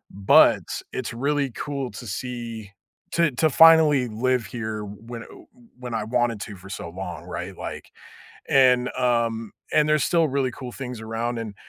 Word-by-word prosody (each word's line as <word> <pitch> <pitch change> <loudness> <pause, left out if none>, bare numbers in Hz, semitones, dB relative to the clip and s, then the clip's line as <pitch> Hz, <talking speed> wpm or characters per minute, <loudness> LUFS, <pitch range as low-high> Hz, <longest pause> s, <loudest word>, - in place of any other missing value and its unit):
but, 100 0 +5 0.3
it's 130 - -4
really 140 +3 0
cool 140 -3 -4
to 115 +3 -9
see 115 -1 -6 0.4
to 170 -3 +3
to 155 +5 +2
finally 155 -4 +6
live 120 +2 0
here 110 -1 -5
when, 115 +3 -9
uh, - - -13
uh, - - -14 0.4
when 125 -1 -6
I 110 - -1
wanted 120 0 0
to 105 - -7
for 95 +1 -13
so 90 -3 -6
long, 90 -1 -7
right? - - -6
Like - - -7 0.6
And, 125 -2 +4
um, 115 -3 0 0.2
and 150 0 +3
there's 155 -1 +3
still 170 -2 +3
really 135 -1 0
cool 125 -1 -8
things 125 -3 -6
around, 115 +2 -3
and 110 -2 -6
120 Hz, 170 wpm, -24 LUFS, 110-135 Hz, 0.6 s, finally